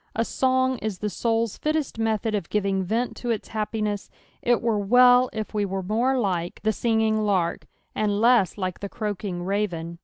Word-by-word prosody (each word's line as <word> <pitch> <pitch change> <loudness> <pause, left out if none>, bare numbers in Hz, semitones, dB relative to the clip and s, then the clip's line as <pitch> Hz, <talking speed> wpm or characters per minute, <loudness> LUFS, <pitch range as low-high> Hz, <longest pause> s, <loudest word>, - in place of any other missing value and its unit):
A 230 - +1
song 260 0 +1
is 215 -4 -3
the 210 +2 -3
soul's 230 -1 -1
fittest 305 -6 -1
method 225 0 0
of 200 -5 -2
giving 195 -2 0
vent 230 +7 -1
to 245 - -5
its 225 -3 -2
happiness, 215 -1 -2 0.3
it 240 0 +2
were 230 -3 0
well 245 +4 +5
if 220 0 -5
we 210 -1 0
were 195 -1 -3
more 235 +7 +1
like 180 -7 -1
the 220 0 +2
flinging 220 -1 +1
lark, 190 -5 0 0.3
and 205 -1 0
less 230 -6 +4
like 185 -3 -3
the 200 - -5
croaking 205 -5 -4
raven. 175 -4 -2
215 Hz, 180 wpm, -25 LUFS, 195-235 Hz, 0.3 s, well